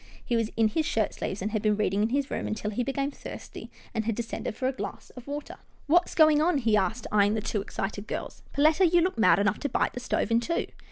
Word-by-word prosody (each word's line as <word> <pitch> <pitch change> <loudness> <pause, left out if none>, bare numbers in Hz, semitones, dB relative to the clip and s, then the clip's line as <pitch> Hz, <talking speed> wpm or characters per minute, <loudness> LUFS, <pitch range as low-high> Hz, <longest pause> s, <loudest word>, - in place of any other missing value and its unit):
He 240 - 0
was 225 -2 +1
in 225 -1 +4
his 315 +9 0
shirtsleeves, 205 -3 -2
and 210 - -2
had 215 -1 -1
been 210 -1 +2
reading 205 -1 +1
in 220 - +2
his 275 +2 -1
room - - -2
until 215 0 -3
he 215 - -1
became 275 +2 -1
thirsty, - - -9 0.2
and 220 -2 -1
had 225 -1 0
descended 225 -1 -4
for 255 - -1
a - - +2
glass 260 - -7
of 250 0 -12
water. 290 +1 -6 0.3
"What's 345 +4 +3
going 310 -2 +6
on?" 335 -1 +3
he 230 -5 +2
asked, 210 +4 0
eyeing 205 0 +3
the - - 0
two 210 -1 -2
excited 200 +1 -4
girls. - - -5
" - - -27
Perletta, 310 +5 +5
you 350 -1 +5
look 360 -8 0
mad 225 - +6
enough 205 +1 +1
to 285 - -2
bite - - 0
the - - -5
stove 245 -1 -1
in 230 - +4
two." 335 +8 -1
230 Hz, 255 wpm, -27 LUFS, 210-285 Hz, 0.3 s, going